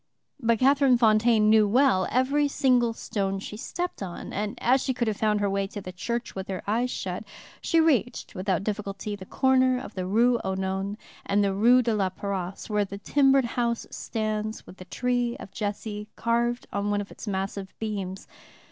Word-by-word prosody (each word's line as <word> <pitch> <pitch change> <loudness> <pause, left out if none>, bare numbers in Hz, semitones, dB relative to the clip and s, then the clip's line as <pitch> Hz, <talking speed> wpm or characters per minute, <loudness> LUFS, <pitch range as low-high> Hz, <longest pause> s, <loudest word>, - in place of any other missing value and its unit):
But 230 -3 +2
Catherine 270 0 +4
Fontaine 220 -1 +4
knew 215 -1 +5
well 235 -4 +3
every 275 +4 +2
single 255 -4 +2
stone 195 -3 -2
she 200 +2 -7
stepped 350 +9 -4
on, 180 -3 -6
and, 205 +1 -3
as 255 +2 +3
she 260 - -1
could 240 -1 -1
have 215 - 0
found 210 -1 +1
her 205 - +2
way 195 0 0
to 205 - -7
the 185 -2 -7
church 235 +6 -4
with 190 0 -6
her 190 -2 -4
eyes 235 +5 0
shut, 185 -4 -4 0.4
she 330 - +2
reached 275 -7 +1
without 185 -1 -1
difficulty 205 0 -4
the 190 -2 -11
corner 260 -1 +3
of 250 - -9
the 185 -1 -3
Rue 235 +4 +3
aux 190 0 -1
Nonnes 190 +2 -2 0.3
and 200 +1 +2
the 200 -1 +1
Rue 240 +6 +5
de 230 -1 +1
la 195 -3 +1
Paroisse, 190 -1 -5
where 210 -1 +1
the 200 0 -6
timbered 270 +4 +3
house 235 0 -1
stands 215 -1 -3
with 185 - -13
the 185 - -10
tree 245 +4 -1
of 195 - -10
Jesse 210 +1 -4
carved 235 +1 0
on 200 0 -1
one 205 0 +1
of 200 - -9
its - - -10
massive 195 0 -3
beams. 195 -3 -4
215 Hz, 190 wpm, -26 LUFS, 195-245 Hz, 0.4 s, knew